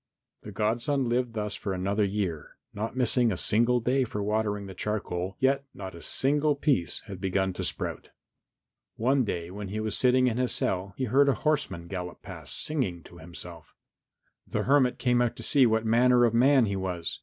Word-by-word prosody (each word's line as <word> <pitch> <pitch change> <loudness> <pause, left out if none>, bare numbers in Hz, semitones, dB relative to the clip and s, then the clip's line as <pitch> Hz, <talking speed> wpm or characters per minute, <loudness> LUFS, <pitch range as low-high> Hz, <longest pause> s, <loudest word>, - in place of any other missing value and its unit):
The 105 - -9
godson 120 +6 0
lived 120 0 0
thus 105 -2 -3
for 100 - -4
another 100 +3 0
year, 95 -6 -3 0.2
not 110 +4 -4
missing 125 -2 +2
a 95 - -2
single 120 +6 +3
day 130 +3 +1
for 105 -4 -4
watering 105 -1 -1
the 95 - -8
charcoal, 95 -2 -3
yet 135 +1 +2
not 95 -1 -7
a 85 - -11
single 145 - +2
piece 140 - 0
had 100 -4 -9
begun 95 0 0
to - - -5
sprout. - - -3 0.9
One 130 +3 +2
day 85 -5 -4
when 100 +1 -6
he 105 +3 -4
was 110 -1 -2
sitting 130 0 +3
in 120 -2 0
his 125 -1 +1
cell 95 +1 -1
he 130 - -2
heard 135 +4 +4
a 140 - +2
horseman 145 - 0
gallop 90 -2 -6
past, - - -4
singing 105 - -2
to 85 - -14
himself. 85 -1 -11 0.7
The - - -2
hermit 130 -2 +3
came 125 -1 +2
out 120 -2 0
to - - -8
see 135 -4 +4
what 110 0 +1
manner 120 +2 +4
of 115 - +1
man 130 +1 +5
he 100 -2 -2
was. 90 -3 -4
110 Hz, 190 wpm, -27 LUFS, 95-125 Hz, 0.9 s, man